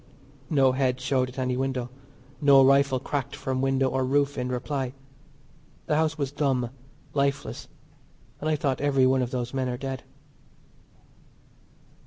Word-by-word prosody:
No 135 -4 +4
head 130 -1 0
showed 130 -1 0
at 125 - -13
any 130 -1 0
window, 130 -2 -2 0.5
no 140 -2 +7
rifle 135 -1 +4
cracked 140 0 -3
from 130 -1 -2
window 135 0 +2
or 130 +1 0
roof 140 +2 +1
in 125 - -2
reply. 130 +1 -2 0.9
The 150 - +1
house 160 0 +1
was 140 -3 -2
dumb, 135 -5 0 0.4
lifeless, 140 0 -1 0.7
and 155 - -2
I 155 - +2
thought 135 -3 -1
every 135 -2 +3
one 130 0 +3
of 125 - -1
those 125 -1 -3
men 130 -1 -1
are 125 - -3
dead. 135 -1 -4
135 Hz, 150 wpm, -26 LUFS, 130-140 Hz, 0.9 s, no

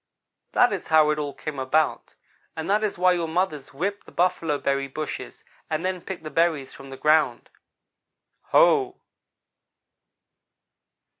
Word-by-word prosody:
"That 245 -4 +4
is 195 - -5
how 155 -1 +5
it 150 - -1
all 145 -1 -4
came 150 -3 -6
about, 150 +4 0 0.4
and 160 0 -4
that 210 +2 +2
is 210 - -1
why 180 +1 +4
your 170 -2 0
mothers 160 -5 -2
whip 200 +9 -3
the - - -14
buffalo 170 -4 +1
berry 140 -1 -1
bushes 150 +2 -6 0.3
and 155 +3 -2
then 185 -1 -2
pick 190 0 -7
the 155 - -7
berries 160 -3 +1
from 135 0 -12
the 135 - -9
ground. 155 +2 +2 0.9
Ho!" 400 -6 +3
160 Hz, 145 wpm, -24 LUFS, 145-185 Hz, 0.9 s, how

